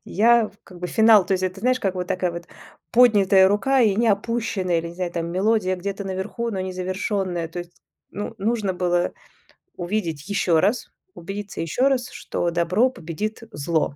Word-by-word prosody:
Я 230 +2 +3
как 180 -2 -13
бы 180 - -2
финал 220 -3 +6
то - - 0
есть 185 0 +1
это 185 +1 -3
знаешь, 255 +3 +2
как 195 -2 -1
вот 180 -1 -4
такая 185 -2 -1
вот 170 0 -7 0.4
поднятая 205 -6 +6
рука 260 +7 +2
и 215 -5 +4
не 230 +3 +2
опущенная, 200 -4 0
или, 170 - -4
не 170 - -10
знаю 180 -1 -3
там, 170 -1 -2
мелодия 190 0 +1
где-то 195 +2 -5
наверху, 195 +5 -3
но 195 -4 -3
не 185 0 -4
завершенная. 185 -1 -2
То 175 +2 -5
есть 175 0 -13 0.3
ну, 205 +3 -5
нужно 210 -1 0
было 175 -1 0 0.6
увидеть 175 -4 -3
еще 175 -5 +2
раз, 210 +8 0 0.2
убедиться 195 +3 -7
ещё 210 - +1
раз, 250 -2 -1
что 170 - -3
добро 180 +9 +2
победит 215 +2 -5
зло. 155 -2 -1
190 Hz, 180 wpm, -23 LUFS, 175-215 Hz, 0.6 s, финал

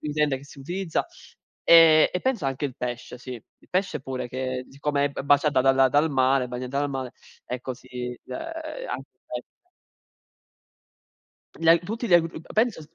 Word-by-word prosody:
ingrediente 150 -2 0
che 135 - -14
si 140 - -14
utilizza. 175 - -2 0.6
E 165 -2 +8
e 180 - -1
penso 255 - 0
anche 135 +1 -2
il 130 - -9
pesce, 125 0 -5
sì, 130 +1 -8
il 115 - -16
pesce 180 -5 0
pure, 130 -1 -4
che 130 0 -3
siccome 140 +1 0
è - - -1
b - - -5
baciata 145 -1 +3
dalla 135 0 +5
dal 150 +3 +3
mare 130 -1 +2
bagnata 125 +2 -4
dal 145 - 0
mare, 130 -2 -4 0.3
ecco 125 +1 -4
si 125 0 -7
uhm, - - -6
anche 325 +8 -6
il - - -51
pesce. - - -6 2.1
Gli 165 - -2
a 165 - +8
tutti 220 +8 -4
gli 185 - +2
agru 165 -1 +3
penso, 220 -6 +1
140 Hz, 170 wpm, -25 LUFS, 130-165 Hz, 2.1 s, E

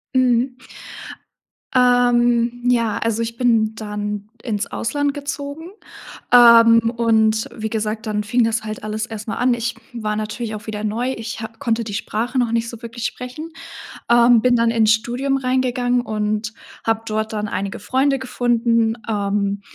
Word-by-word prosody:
Mhm. 250 0 +2 1.2
Ähm, 245 -1 +3
ja, 230 -4 +1
also, 230 0 -1
ich 230 0 -4
bin 225 -3 +2
dann 210 -1 -5
ins 215 -3 -2
Ausland 285 +3 -1
gezogen, 285 +4 -6 0.6
ähm, 230 -1 +7
und 220 -1 +2
wie 220 -1 -4
gesagt, 220 +1 -3
dann 210 -1 -1
fing 240 +3 +2
das 225 -1 -1
halt 215 0 -6
alles 215 +1 -3
erst 220 -1 -8
mal 225 - -2
an. 250 0 +2
Ich 235 0 -3 0.2
war 215 -3 -3
natürlich 215 +1 -4
auch 210 - -8
wieder 210 -1 -4
neu. 235 +5 -1
Ich 225 +2 -6
ha 220 - -4
konnte 230 -4 -1
die 210 -2 -6
Sprache 235 +5 -2
noch 240 -2 +1
nicht 230 0 0
so 235 - -10
wirklich 235 0 -7
sprechen, 255 +8 -5 0.6
ähm, 235 -1 +6
bin 250 0 +3
dann 230 -1 +2
ins 220 -2 +3
Studium 245 +4 -1
reingegangen 255 -1 0
und 215 -1 -2 0.3
hab 225 0 0
dort 220 0 -2
dann 210 0 -2
einige 200 -1 -4
Freunde 270 +5 +1
gefunden, 235 -3 +1
ähm, 200 -1 -1
230 Hz, 160 wpm, -20 LUFS, 215-245 Hz, 1.2 s, ähm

